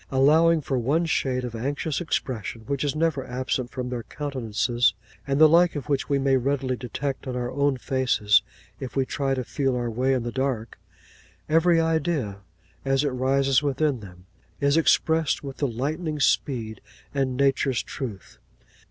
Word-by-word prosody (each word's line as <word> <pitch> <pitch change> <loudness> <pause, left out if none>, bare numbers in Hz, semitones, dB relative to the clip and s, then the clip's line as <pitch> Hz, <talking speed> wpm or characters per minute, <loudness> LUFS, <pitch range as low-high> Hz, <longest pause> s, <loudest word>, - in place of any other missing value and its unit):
Allowing 155 +5 +4
for 135 -2 -1
one 145 +8 +1
shade 130 -5 0
of 120 - -6
anxious 140 +7 -2
expression 120 - -3
which 140 +5 -3
is 145 0 -1
never 155 -4 0
absent 130 0 -2
from 125 0 -5
their 125 -1 -3
countenances, 120 -3 0 0.3
and 140 0 0
the 155 - +9
like 170 +2 +4
of 145 - -5
which 140 -2 0
we 140 - +2
may 135 -1 +3
readily 130 0 0
detect 135 +3 -4
in 125 - -3
our 125 -1 -2
own 140 0 +1
faces 125 -6 +2 0.4
if 130 - -7
we 135 -1 +2
try 135 0 -1
to 130 - -2
feel 135 +1 -1
our 120 -1 -2
way 130 +4 +1
in 125 - -1
the 120 - -3
dark, 130 -3 -2 0.7
every 165 +2 +4
idea, 160 - 0 0.4
as 135 +1 +1
it 145 - +1
rises 135 +1 +2
within 145 -1 0
them, 90 -3 -13 0.3
is 140 +1 +2
expressed 160 -1 +2
with 135 -1 -7
the 140 - 0
lightning's 150 +5 -1
speed 110 -6 -1 0.3
and 135 -3 -1
nature's 135 -3 +2
truth. 110 -8 -7
135 Hz, 170 wpm, -25 LUFS, 125-145 Hz, 0.7 s, the